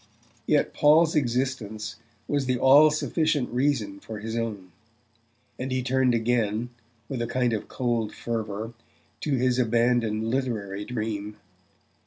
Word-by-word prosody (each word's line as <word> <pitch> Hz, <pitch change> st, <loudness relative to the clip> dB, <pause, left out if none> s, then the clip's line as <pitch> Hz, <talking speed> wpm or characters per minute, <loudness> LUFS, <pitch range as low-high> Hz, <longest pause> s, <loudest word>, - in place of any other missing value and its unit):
Yet -, -, +2 dB
Paul's 160 Hz, +2 st, +4 dB
existence 120 Hz, -5 st, -1 dB, 0.3 s
was 140 Hz, -2 st, 0 dB
the 125 Hz, -1 st, +1 dB
all 140 Hz, +5 st, +7 dB
sufficient 155 Hz, -2 st, 0 dB
reason 120 Hz, -6 st, 0 dB
for 110 Hz, +1 st, -8 dB
his 110 Hz, +2 st, -5 dB
own; 105 Hz, -6 st, -4 dB, 0.9 s
and 130 Hz, +1 st, -3 dB
he 130 Hz, 0 st, 0 dB
turned 130 Hz, -1 st, +2 dB
again, 115 Hz, 0 st, 0 dB, 0.4 s
with 130 Hz, -3 st, -4 dB
a 115 Hz, -, -1 dB
kind 125 Hz, -2 st, 0 dB
of 110 Hz, -, -3 dB
cold 120 Hz, -4 st, -1 dB
fervour, 110 Hz, -1 st, -4 dB, 0.5 s
to 145 Hz, +2 st, 0 dB
his 125 Hz, 0 st, +1 dB
abandoned 115 Hz, -2 st, +1 dB
literary 110 Hz, -6 st, -2 dB
dream. 105 Hz, -3 st, -4 dB
120 Hz, 130 wpm, -26 LUFS, 110-130 Hz, 0.9 s, all